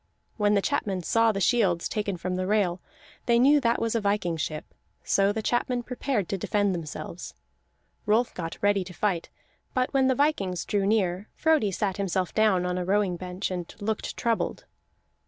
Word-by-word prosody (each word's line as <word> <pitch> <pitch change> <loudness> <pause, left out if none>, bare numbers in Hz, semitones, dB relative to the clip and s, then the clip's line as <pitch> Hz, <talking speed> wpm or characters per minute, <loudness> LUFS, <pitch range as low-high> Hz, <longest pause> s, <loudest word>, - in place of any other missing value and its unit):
When 210 -1 +2
the 200 - +2
chapmen 190 -3 -1
saw 230 +5 +3
the 195 - -3
shields 195 -5 +2
taken 205 -3 -2
from 180 +2 -3
the 185 0 -2
rail, 190 -4 +1 0.5
they 235 -1 +4
knew 285 +4 +5
that 235 -2 +2
was 230 -1 0
a 230 - 0
viking 200 -4 0
ship. 155 -1 -4 0.4
So 195 0 +3
the 220 +1 -3
chapmen 245 +1 0
prepared 250 -5 -2
to 195 - -2
defend 205 +1 +1
themselves. 170 +1 -6 0.7
Rolf 225 +3 +2
got 165 -2 -5
ready 205 -1 +3
to 180 -1 -10
fight; 190 -6 -1 0.5
but 255 +1 0
when 265 -1 +3
the 260 - +3
vikings 200 - 0
drew 200 -2 0
near, 200 -2 0
Frodi 310 -9 +2
sat 195 0 -2
himself 190 -2 -1
down 210 -5 +3
on 180 0 -1
a - - -1
rowing 195 0 +1
bench, 180 +2 -4
and 175 -2 -4
looked 215 +1 -3
troubled. 230 -1 -1
200 Hz, 180 wpm, -27 LUFS, 180-225 Hz, 0.7 s, knew